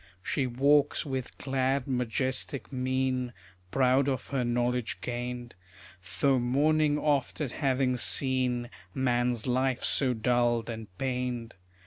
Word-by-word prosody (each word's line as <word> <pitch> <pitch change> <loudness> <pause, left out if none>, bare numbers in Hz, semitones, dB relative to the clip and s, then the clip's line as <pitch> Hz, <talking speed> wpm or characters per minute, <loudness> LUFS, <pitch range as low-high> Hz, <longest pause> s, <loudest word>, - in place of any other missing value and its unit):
She 135 +3 0
walks 140 +5 +3
with 130 -3 -4
glad 135 0 0
majestic 130 +1 -2
mien, 130 -1 -1 0.4
Proud 130 +3 +3
of 130 - -3
her 135 -3 0
knowledge 120 0 -1
gained; 120 0 -5 0.7
Though 135 -2 +4
mourning 145 +4 +2
oft 145 -3 0
at 145 -5 -2
having 130 -3 +1
seen 125 -1 +2 0.2
Man's 120 -2 +1
life 130 0 0
so 130 -3 +2
dulled 120 0 +1
and 110 -1 -7
pained. 125 -2 -3
130 Hz, 115 wpm, -29 LUFS, 120-135 Hz, 0.7 s, Though